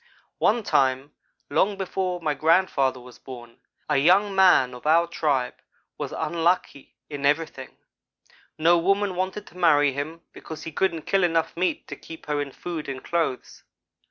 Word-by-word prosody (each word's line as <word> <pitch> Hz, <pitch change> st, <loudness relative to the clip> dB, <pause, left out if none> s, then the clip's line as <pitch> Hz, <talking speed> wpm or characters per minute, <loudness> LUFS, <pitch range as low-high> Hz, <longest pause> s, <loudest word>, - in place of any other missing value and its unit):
"One 230 Hz, +1 st, +2 dB
time, 135 Hz, -3 st, +1 dB, 0.4 s
long 200 Hz, 0 st, +2 dB
before 185 Hz, -1 st, -2 dB
my 155 Hz, -2 st, 0 dB
grandfather 145 Hz, -4 st, +2 dB
was 125 Hz, 0 st, -14 dB
born, 120 Hz, -2 st, -11 dB, 0.3 s
a 150 Hz, -, +1 dB
young 190 Hz, +8 st, +4 dB
man 180 Hz, -10 st, +5 dB
of 125 Hz, +4 st, -8 dB
our 165 Hz, +2 st, +5 dB
tribe 145 Hz, -7 st, -1 dB, 0.4 s
was -, -, -5 dB
unlucky 170 Hz, -4 st, -1 dB
in 145 Hz, -2 st, -7 dB
everything. 150 Hz, +3 st, -1 dB, 0.8 s
No 170 Hz, +2 st, +4 dB
woman 195 Hz, +2 st, +1 dB
wanted 190 Hz, +3 st, -3 dB
to -, -, -16 dB
marry 145 Hz, -5 st, +4 dB
him, 155 Hz, +4 st, -5 dB
because 160 Hz, -, -9 dB
he 165 Hz, -, -6 dB
couldn't 165 Hz, -1 st, -1 dB
kill 195 Hz, -1 st, +1 dB
enough 165 Hz, -2 st, +1 dB
meat 180 Hz, +2 st, -1 dB
to -, -, -7 dB
keep 165 Hz, -, -12 dB
her 150 Hz, -1 st, -1 dB
in 140 Hz, -1 st, -5 dB
food 165 Hz, 0 st, -6 dB
and 130 Hz, -1 st, -6 dB
clothes. 165 Hz, -6 st, -2 dB
165 Hz, 155 wpm, -24 LUFS, 140-180 Hz, 0.8 s, man